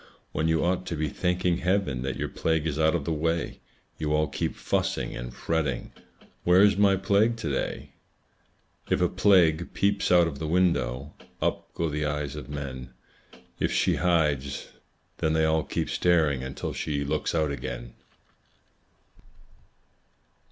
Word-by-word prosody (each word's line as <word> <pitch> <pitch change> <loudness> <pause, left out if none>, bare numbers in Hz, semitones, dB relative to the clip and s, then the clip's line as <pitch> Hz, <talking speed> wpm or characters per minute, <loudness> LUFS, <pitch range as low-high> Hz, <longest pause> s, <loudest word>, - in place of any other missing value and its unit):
When 80 - 0
you 80 -1 +2
ought 90 +1 0
to 85 - -2
be 75 -1 -1
thanking 90 +1 0
Heaven 90 -8 0
That 65 +1 -2
your - - -2
plague 80 -1 -1
is 80 -1 -2
out 80 +1 +3
of 80 -5 -2
the 80 - 0
way, 80 +2 -1 0.4
You 75 -1 0
all 75 0 +2
keep 70 - -3
fussing - - -1
and - - -6
fretting 80 -6 -2 0.5
"Where 90 +2 +6
is 105 -2 +5
my 100 0 +4
Plague 100 +4 +2
to 110 -10 -3
day?" 70 - -3 1.0
If - - +2
a - - +3
Plague 85 -4 +3
peeps 100 0 +1
out 90 -1 +6
of 75 -5 -4
the 80 - -3
window, 75 -6 +1 0.3
Up - - -2
go 85 - 0
the 75 0 -2
eyes 75 -1 -2
of 70 -4 -8
men; 65 -4 -6 0.6
If - - +1
she - - +2
hides, 75 -6 0 0.5
then 80 - +1
they 80 0 +3
all 80 0 +2
keep - - -2
staring 80 -7 +2
Until 65 +1 -5
she 70 -2 -2
looks 70 - -1
out 80 -3 +1
again. - - -6
80 Hz, 160 wpm, -27 LUFS, 70-90 Hz, 1.0 s, Where